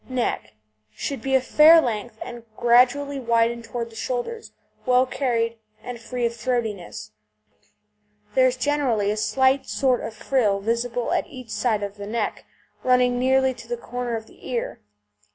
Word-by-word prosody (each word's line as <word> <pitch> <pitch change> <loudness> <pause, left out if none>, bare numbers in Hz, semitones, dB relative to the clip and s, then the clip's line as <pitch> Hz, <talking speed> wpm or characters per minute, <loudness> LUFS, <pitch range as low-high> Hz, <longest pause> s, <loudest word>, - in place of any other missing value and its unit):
NECK 235 - -2 0.4
Should 275 - -4
be 270 0 +1
of 260 - +3
a - - -14
fair 315 +4 +8
length, 230 -5 -2
and 240 -1 -8 0.2
gradually 255 +4 +3
widening 235 -1 +1
towards 235 0 -5
the - - -15
shoulders, 255 - -4 0.3
well 255 0 +4
carried, 230 -4 -1 0.2
and 245 -1 -6
free 245 +1 -3
of 235 - 0
throatiness. 220 - -3 1.2
There 260 0 +5
is 255 0 -1
generally 255 -8 +1
a - - -1
slight 265 +5 +2
sort 255 -2 +1
of 220 - -6
frill 215 -6 +1
visible 235 +3 -1
at - - 0
each 255 -4 -10
side 210 -1 0
of 200 0 -5
the 200 0 -7
neck, 225 0 -3 0.4
running 250 -1 +3
nearly 265 +1 +3
to 240 -2 -13
the 240 0 -3
corner 245 0 -4
of 220 -1 -5
the - - -13
ear. 240 -2 -3
245 Hz, 165 wpm, -24 LUFS, 230-260 Hz, 1.2 s, fair